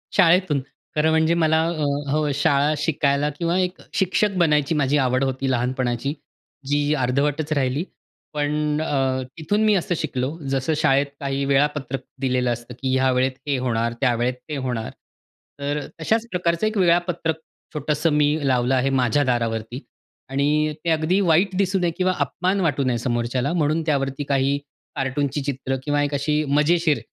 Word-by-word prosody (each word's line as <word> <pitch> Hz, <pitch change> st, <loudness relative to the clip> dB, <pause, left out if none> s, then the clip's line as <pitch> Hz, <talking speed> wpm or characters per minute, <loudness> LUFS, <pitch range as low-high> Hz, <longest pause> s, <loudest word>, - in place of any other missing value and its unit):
शाळेतून. 175 Hz, -5 st, +4 dB, 0.3 s
खरं 155 Hz, +1 st, +3 dB
म्हणजे 160 Hz, +1 st, +3 dB
मला 160 Hz, -1 st, +3 dB
अ, 160 Hz, -3 st, -2 dB, 0.3 s
हो 150 Hz, 0 st, +1 dB
शाळा 145 Hz, 0 st, +2 dB
शिकायला 145 Hz, -1 st, +1 dB
किंवा 170 Hz, +1 st, +1 dB
एक 180 Hz, 0 st, -2 dB
शिक्षक 195 Hz, +2 st, +1 dB
बनायची 150 Hz, -3 st, +2 dB
माझी 145 Hz, 0 st, +2 dB
आवड 130 Hz, -1 st, +2 dB
होती 135 Hz, 0 st, -1 dB
लहानपणाची 125 Hz, +1 st, -1 dB, 0.5 s
जी 145 Hz, +1 st, +1 dB
अर्धवटच 145 Hz, +4 st, 0 dB
राहिली. 135 Hz, +1 st, 0 dB, 0.5 s
पण 150 Hz, +1 st, 0 dB
अ, 135 Hz, -4 st, 0 dB, 0.2 s
तिथून 205 Hz, +7 st, 0 dB
मी 215 Hz, -, +4 dB
असं 175 Hz, -1 st, 0 dB
शिकलो 130 Hz, +4 st, -3 dB
जसं 135 Hz, +3 st, 0 dB
शाळेत 140 Hz, -1 st, +3 dB
काही 140 Hz, -1 st, -2 dB
वेळापत्रक 140 Hz, -1 st, 0 dB, 0.2 s
दिलेलं 125 Hz, -2 st, +1 dB
असतं, 120 Hz, +1 st, -9 dB
की 130 Hz, -1 st, 0 dB
ह्या 130 Hz, 0 st, +3 dB
वेळेत 130 Hz, +1 st, +2 dB, 0.2 s
हे 140 Hz, -2 st, +1 dB
होणार 115 Hz, -2 st, -1 dB
त्यावेळेत 125 Hz, -1 st, +1 dB, 0.2 s
ते 150 Hz, -, -3 dB
होणार. 125 Hz, -4 st, -3 dB, 0.7 s
तर 145 Hz, +1 st, -2 dB
अ, 145 Hz, -, -7 dB
तशाच 225 Hz, +7 st, +1 dB
प्रकारचं 175 Hz, +2 st, 0 dB
एक 215 Hz, 0 st, -2 dB
वेळापत्रक 175 Hz, -3 st, +1 dB, 0.4 s
छोटंसं 150 Hz, +1 st, 0 dB
मी 150 Hz, -1 st, +3 dB, 0.2 s
लावलं 125 Hz, 0 st, +2 dB
आहे 130 Hz, +1 st, +1 dB
माझ्या 135 Hz, +1 st, +2 dB
दारावरती. 115 Hz, -1 st, -1 dB, 0.5 s
आणि 150 Hz, +3 st, +1 dB
ते -, -, +1 dB
अगदी 160 Hz, +4 st, +2 dB
वाईट 185 Hz, +2 st, +3 dB
दिसू 190 Hz, 0 st, +1 dB
नये 175 Hz, -1 st, +1 dB
किंवा 185 Hz, 0 st, +2 dB
अपमान 180 Hz, +8 st, 0 dB
वाटू 145 Hz, -5 st, +1 dB
नये 125 Hz, -2 st, +1 dB
समोरच्याला 120 Hz, +4 st, -1 dB
म्हणून 155 Hz, -1 st, +1 dB
त्यावरती 135 Hz, -2 st, -1 dB
काही 140 Hz, 0 st, +2 dB, 0.4 s
कार्टूनची 135 Hz, +2 st, -1 dB
चित्र 135 Hz, -1 st, -2 dB
किंवा 145 Hz, 0 st, +1 dB
एक 145 Hz, 0 st, -2 dB
अशी 150 Hz, +2 st, 0 dB
मजेशीर 150 Hz, 0 st, +3 dB
145 Hz, 155 wpm, -22 LUFS, 130-160 Hz, 0.7 s, शाळेतून